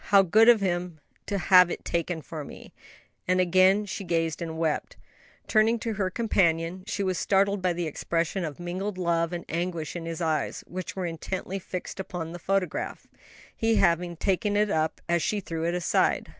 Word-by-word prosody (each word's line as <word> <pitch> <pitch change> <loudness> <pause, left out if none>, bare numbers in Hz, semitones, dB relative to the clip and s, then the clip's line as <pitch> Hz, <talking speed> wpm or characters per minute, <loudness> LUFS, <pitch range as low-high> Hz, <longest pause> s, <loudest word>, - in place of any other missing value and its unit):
How 200 -1 +6
good 220 +6 +5
of 230 -3 +6
him 175 -3 -2 0.3
to 200 - -1
hive 180 -1 +6
it - - -5
taken 170 -1 -2
for 155 0 -6
me!" - - -12 0.5
and 185 0 +2
again 185 +3 +4
she 200 0 -5
gazed 165 -3 -1
and 160 -1 -4
wept. 165 - -1 0.5
Turning 220 +1 +3
to 225 0 -3
her 195 -2 -1
companion 180 -4 +1
she 205 -1 -2
was 185 -2 -1
startled 200 0 +2
by 180 -1 +1
the 175 0 -2
expression 165 +4 -2
of 155 -2 -5
mingled 185 +3 -4
love 170 -2 0
and 175 -1 -5
anguish 170 -1 -3
in 165 -1 -5
his 165 -1 -4
eyes, 160 -2 -1
which 185 0 -6
were 190 -2 -2
intently 185 +3 -4
fixed 185 +1 -6
upon 175 -3 -5
the 175 - -6
other - - -15
photograph; 190 -2 -2 0.5
he 225 0 +1
having 175 -2 +2
taken 205 +3 0
it 210 -1 +2
up 160 0 0
as 170 -1 +2
she 210 - 0
threw 165 -4 -4
it 170 +1 0
aside. 180 - +1
180 Hz, 190 wpm, -27 LUFS, 165-195 Hz, 0.5 s, How